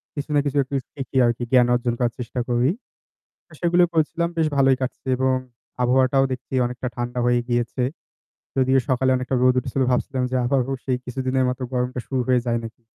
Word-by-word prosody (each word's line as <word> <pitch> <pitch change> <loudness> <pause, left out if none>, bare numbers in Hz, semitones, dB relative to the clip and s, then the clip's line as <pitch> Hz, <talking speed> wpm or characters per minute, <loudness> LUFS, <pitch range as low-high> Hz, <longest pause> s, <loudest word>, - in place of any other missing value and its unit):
কিছু 145 0 -5
না - - +5
কিছু 145 0 -1
একটু 140 +1 -6 0.2
শিখি 135 -1 -5
আরকি 120 +1 0
জ্ঞান 125 -2 +5
অর্জন 120 0 0
করার 120 -2 +1
চেষ্টা 125 +1 -4
করি। 120 +2 +2 0.8
আ - - -27
সেগুলোই 175 0 +3
করেছিলাম 165 +1 +1
বেশ 160 -1 +3
ভালোই 135 -1 +5
কাটছে 130 +1 -4
এবং 130 0 +2 0.5
আবহাওয়াটাও 130 +2 +3
দেখছি 130 +1 -6
অনেকটা 125 +1 -4
ঠান্ডা 120 0 -3
হয়েই 120 0 +3
গিয়েছে। 120 +1 0 0.7
যদিও 130 0 +4
সকালে 130 0 +2
অনেকটা 125 +1 -2
রোদ 130 0 +5
উঠেছিল 135 - -3
ভাবছিলাম 130 +1 0
যে - - -1
আবারো 130 +1 +1
সেই 130 -2 0
কিছুদিনের 130 +1 0
মতো 125 +1 -4
গরমটা 125 0 -1
শুরু 130 -2 0
হয়ে 125 -1 +3
যায় 120 -1 0
নাকি। 115 +1 -9
130 Hz, 185 wpm, -23 LUFS, 125-135 Hz, 0.8 s, না